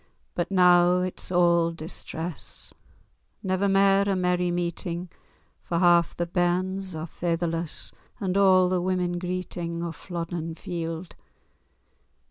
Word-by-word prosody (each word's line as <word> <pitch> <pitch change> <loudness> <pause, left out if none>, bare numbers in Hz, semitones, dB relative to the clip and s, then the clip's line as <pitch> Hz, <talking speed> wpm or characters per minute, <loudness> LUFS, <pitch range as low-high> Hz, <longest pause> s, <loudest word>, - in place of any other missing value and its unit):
But 175 0 -2
noo 180 -1 +5
it's 185 - -4
a' 170 -2 +3
distress— 160 0 -4 0.7
Never 190 +1 +1
mair 195 +1 +4
a 195 - +2
merry 180 -1 +1
meetin 175 0 -3 0.2
'; - - -39
For 170 - -1
half 175 -1 +4
the 175 - -1
bairns 185 +1 -1
are 155 0 -4
faitherless, 165 -1 -2 0.3
And 190 -4 -1
a' 190 -2 +5
the 180 -1 0
women 180 -1 0
greetin'. 175 -2 -4
O 170 - -3
Flodden 165 0 -5
Field! 165 0 -5
175 Hz, 120 wpm, -26 LUFS, 170-185 Hz, 0.7 s, noo